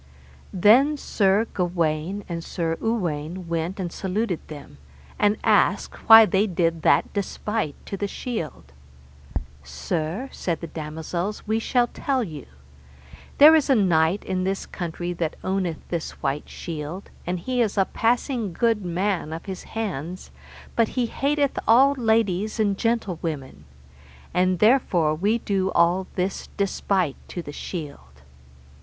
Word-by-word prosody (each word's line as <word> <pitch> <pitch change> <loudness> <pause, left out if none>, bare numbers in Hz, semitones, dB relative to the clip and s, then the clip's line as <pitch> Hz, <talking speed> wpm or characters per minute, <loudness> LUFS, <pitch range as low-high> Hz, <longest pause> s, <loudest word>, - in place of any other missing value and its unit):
Then 245 +11 +5
Sir 205 -4 +2
Gawaine 175 +1 -1
and 170 -1 -4
Sir 165 -2 -2
Uwaine 180 -6 -2
went 170 +3 -2
and 175 -2 -3
saluted 190 -1 -2
them, 145 - -11 0.4
and 205 +1 +3
asked - - +1
why 225 0 +11
they 200 +2 +2
did 165 -3 0
that - - +3
despite 205 -4 -2
to 195 - -5
the 205 - -2
shield. 195 - -5 0.9
Sir, 155 - -3
said 170 -3 -3
the - - -6
damosels, 160 +5 -4
we 220 +1 +1
shall 245 +1 +2
tell 260 +1 -1
you. 155 - -8 0.9
There 300 +2 +9
is 300 -2 +2
a 270 - +6
knight 175 -2 +2
in 185 -1 -1
this 195 +1 -2
country 175 0 -4
that 165 -2 -2
owneth 185 -4 -2
this 170 -2 -3
white 140 +1 -2
shield, 165 +3 -6 0.2
and 180 +1 -1
he 250 +6 -1
is 215 -3 0
a 195 - +4
passing 235 - 0
good 225 +2 +1
man 180 -1 -1
of 165 +1 -6
his 190 -2 -6
hands, 180 -5 -4 0.4
but 230 -1 +3
he 250 - +3
hateth 280 +3 0
all 265 +5 +6
ladies 220 -4 +1
and 205 -2 +2
gentlewomen, 165 - -3 0.7
and 185 0 +2
therefore 190 - +3
we 200 +8 +1
do 195 -4 -1
all 175 +2 +3
this 185 +1 -2
despite 190 -5 0
to 175 - -6
the 145 - -8
shield. 155 -2 -6
185 Hz, 140 wpm, -24 LUFS, 165-220 Hz, 0.9 s, why